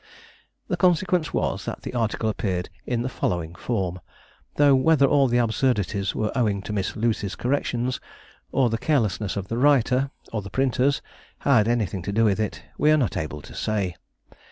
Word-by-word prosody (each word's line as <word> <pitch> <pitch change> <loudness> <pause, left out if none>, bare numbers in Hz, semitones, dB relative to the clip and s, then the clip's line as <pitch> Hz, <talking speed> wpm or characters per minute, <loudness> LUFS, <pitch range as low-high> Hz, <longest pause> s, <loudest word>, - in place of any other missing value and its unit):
The - - -1
consequence 180 -2 +2
was - - -1
that - - -5
the - - -6
article 115 -2 -1
appeared 95 -5 -2 0.2
in 120 -1 0
the - - -1
following 85 -9 -2
form, 90 -2 -2 0.6
though 145 -1 +5
whether 140 +2 +4
all 140 0 +4
the 120 0 +2
absurdities 110 -5 0
were 110 -1 -1
owing 105 -6 +1
to 105 - -5
Miss 100 -2 -2
Lucy's 110 -3 -1
corrections, 125 -1 -1 0.5
or 130 -4 +2
the 115 - -1
carelessness 110 - 0
of 95 -1 -4
the 115 +3 -2
writer, 135 -1 +3 0.2
or 110 - -1
the 100 - -8
printers, 135 +5 +1 0.4
had 125 -7 +4
anything 105 -6 0
to 95 - -4
do 115 +3 +3
with 105 -1 +2
it, 110 - -3 0.2
we 150 - +4
are 155 - +6
not 130 -7 0
able 75 -2 -4
to - - -12
say. 100 -5 -1
115 Hz, 180 wpm, -24 LUFS, 100-135 Hz, 0.6 s, are